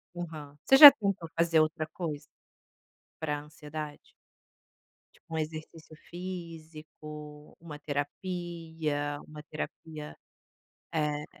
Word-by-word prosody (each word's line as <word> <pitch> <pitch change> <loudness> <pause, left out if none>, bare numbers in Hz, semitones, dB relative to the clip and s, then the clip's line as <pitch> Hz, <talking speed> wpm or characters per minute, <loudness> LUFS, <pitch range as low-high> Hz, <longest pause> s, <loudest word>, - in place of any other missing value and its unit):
Aham. 155 -4 -7
Você 270 - +7
já 290 0 +15
tentou 200 -8 -3
fazer 165 -1 +4
outra 155 0 +1
coisa 155 -5 -4 1.0
para 150 -2 -1
ansiedade 150 0 -8 1.1
tipo - - -27
um 160 - -1
exercício 155 0 -6
físico, 155 -4 -9
uma 155 -3 -9
terapia, 155 -1 -3
uma 150 0 -10
terapia, 155 0 -7 0.8
eh 150 -1 -1
155 Hz, 95 wpm, -30 LUFS, 150-165 Hz, 1.1 s, já